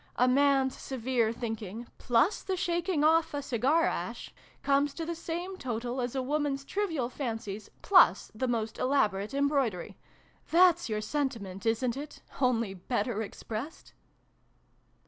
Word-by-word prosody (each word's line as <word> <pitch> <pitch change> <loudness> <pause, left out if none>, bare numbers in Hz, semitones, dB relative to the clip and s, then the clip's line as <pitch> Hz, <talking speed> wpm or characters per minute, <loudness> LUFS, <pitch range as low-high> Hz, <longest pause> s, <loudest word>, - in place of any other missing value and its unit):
A 250 - +3
Man's 270 0 +3
severe 245 -3 0
thinking, 225 -1 -5
plus 245 - +2
the 380 -1 -2
shaking 345 -2 0
off 320 -1 +3
a 285 - -1
cigar 270 +6 +2
ash, - - -4 0.3
comes 280 0 +2
to 330 - -4
the 340 - -2
same 345 +3 -5
total 245 -2 -3
as 245 +1 -3
a 260 - 0
Woman's 280 0 -1
trivial 330 -11 -1
fancies, 225 -5 -5
plus 360 - +5
the 255 +4 -2
most 225 -2 -2
elaborate 215 -4 +1
embroidery. 275 - 0 0.5
That's 350 -4 +5
your 215 -1 -1
sentiment, 220 -6 -3
isn't 230 +2 +1
it, 290 +2 -8 0.2
only 230 -6 +2
better 215 +3 -2
expressed 225 +6 -7
260 Hz, 135 wpm, -30 LUFS, 225-295 Hz, 0.5 s, plus